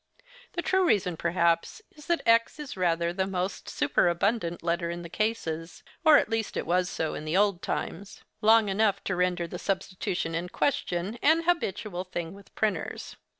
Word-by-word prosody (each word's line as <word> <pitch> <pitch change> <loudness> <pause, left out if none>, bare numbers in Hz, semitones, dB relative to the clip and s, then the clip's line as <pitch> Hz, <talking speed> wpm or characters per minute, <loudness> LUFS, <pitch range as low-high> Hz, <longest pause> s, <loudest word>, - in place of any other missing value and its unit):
The 345 - -2
true 380 0 +2
reason, 190 - +2
perhaps, 170 - +1
is 300 0 -15
that 340 -1 +1
x 230 +3 +4
is 295 -2 -6
rather 170 -2 +1
the 190 +1 -1
most 185 0 -3
superabundant 175 0 +1
letter 170 0 0
in 170 0 -5
the 170 - -8
cases, 165 -6 -3 0.2
or 315 -2 +8
at - - +2
least 225 0 -2
was 180 +2 +1
so 160 -1 -2
in - - -5
the 155 +4 0
old 200 -3 +2
times—long 215 +3 0
enough 200 0 +1
to 185 - -1
render 180 -1 +1
the 175 +1 -7
substitution 185 -3 -2
in 170 +2 -3
question 200 -3 -1
an 320 +3 +4
habitual 210 - -1
thing 175 -2 -5
with 200 0 -16
printers. 215 -2 -2
185 Hz, 165 wpm, -28 LUFS, 170-220 Hz, 0.2 s, or